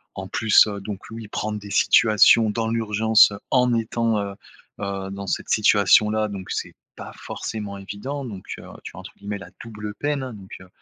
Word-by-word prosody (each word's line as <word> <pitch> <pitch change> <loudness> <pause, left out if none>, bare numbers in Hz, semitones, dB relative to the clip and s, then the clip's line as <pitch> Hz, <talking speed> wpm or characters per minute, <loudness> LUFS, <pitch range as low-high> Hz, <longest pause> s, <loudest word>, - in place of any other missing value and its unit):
en 95 +1 -6
plus, 110 +2 +4
heu, 100 -1 -5
donc 100 -1 -6
oui, 115 -1 -8
prendre 105 0 -4
des 100 0 -11
situations 110 +2 +5
dans 110 +1 -2
l'urgence 110 -1 +4 0.2
en 125 -2 +3
étant, 115 -1 0
heu 100 -1 -4 0.4
heu, 100 -1 -4
dans 100 0 -7
cette - - -3
situation-là, 105 +1 +4
donc 95 -2 -8
c'est - - -4 0.2
pas - - -9
forcément 105 -2 -6
évident 115 +9 -6
donc 100 -6 -8 0.2
heu, - - -12 0.2
tu - - -9
as, - - -9
entre - - -10
guillemets, 100 0 -5
la 100 - -11
«double 105 -2 -7
peine» 145 -2 -2
hein, 130 - -6
donc, 95 -3 -13
heu 95 - -14
105 Hz, 190 wpm, -23 LUFS, 100-115 Hz, 0.4 s, situations